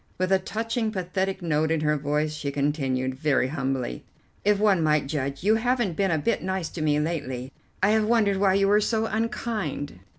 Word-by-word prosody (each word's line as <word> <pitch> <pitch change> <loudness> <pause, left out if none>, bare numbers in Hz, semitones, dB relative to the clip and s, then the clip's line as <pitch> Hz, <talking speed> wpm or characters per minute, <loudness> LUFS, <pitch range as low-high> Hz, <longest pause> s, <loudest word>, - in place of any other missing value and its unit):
With 185 +1 -1
a 190 - +5
touching 225 +3 -2
pathetic 190 0 -2
note 155 -1 +1
in 160 -1 +1
her 150 0 +2
voice 150 +1 -1
she 150 -2 -4
continued, 135 -3 -1
very 135 -2 +1
humbly, 135 - -3 0.4
if 210 0 +3
one 200 -4 +3
might 150 -2 +2
judge, 140 0 -3
"You 210 +2 +4
haven't 240 -6 0
been 195 +1 +1
a 160 - +2
bit 230 +10 0
nice 190 -3 -2
to 165 - -6
me 150 -1 +2
lately. 140 -5 -3 0.3
I 205 - +5
have 220 0 +3
wondered 215 -3 +2
why 190 -1 +3
you 195 0 +3
were 210 +1 +4
so 220 +1 0
unkind." 220 - -3
170 Hz, 195 wpm, -25 LUFS, 145-205 Hz, 0.4 s, a